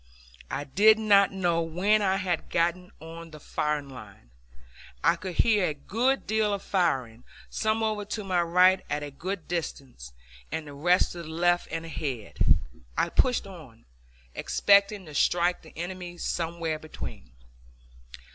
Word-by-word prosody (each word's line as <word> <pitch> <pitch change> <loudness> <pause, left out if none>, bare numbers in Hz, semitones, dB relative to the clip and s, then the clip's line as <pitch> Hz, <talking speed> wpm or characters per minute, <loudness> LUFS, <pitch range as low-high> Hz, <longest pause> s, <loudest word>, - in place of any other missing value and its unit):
I 145 - -3
did 210 +10 +5
not 200 -3 +4
know 175 -3 0
when 185 +6 +2
I 190 -1 +2
had 185 -3 -2
gotten 175 +2 0
on 165 +1 -10
the 155 -1 -12
firing 150 -1 -2
line! 105 - -13 0.7
I 165 +3 +4
could 185 -4 -7
hear 210 -3 +3
a 150 - -3
good 240 - 0
deal 215 -1 +1
of 195 - -8
firing, 130 - 0 0.3
some 220 0 0
over 215 -1 -1
to 210 +1 -4
my 185 -3 +1
right 180 +2 +4
at 150 - -2
a 145 - -6
good 180 +5 -5
distance, 135 - -5 0.4
and 160 - -3
the 145 - -10
rest 175 +6 +2
to 175 - -7
the 160 - -9
left 175 +2 +1
and 165 0 -4
ahead. 135 -9 -5 0.6
I - - +2
pushed 250 -4 +2
on, 155 -12 -13 0.5
expecting 200 -1 +3
to 155 - -11
strike 175 +4 +2
the - - -16
enemy 175 0 -6
somewhere 165 -2 -2
between. 155 - -9
175 Hz, 155 wpm, -27 LUFS, 155-195 Hz, 0.7 s, did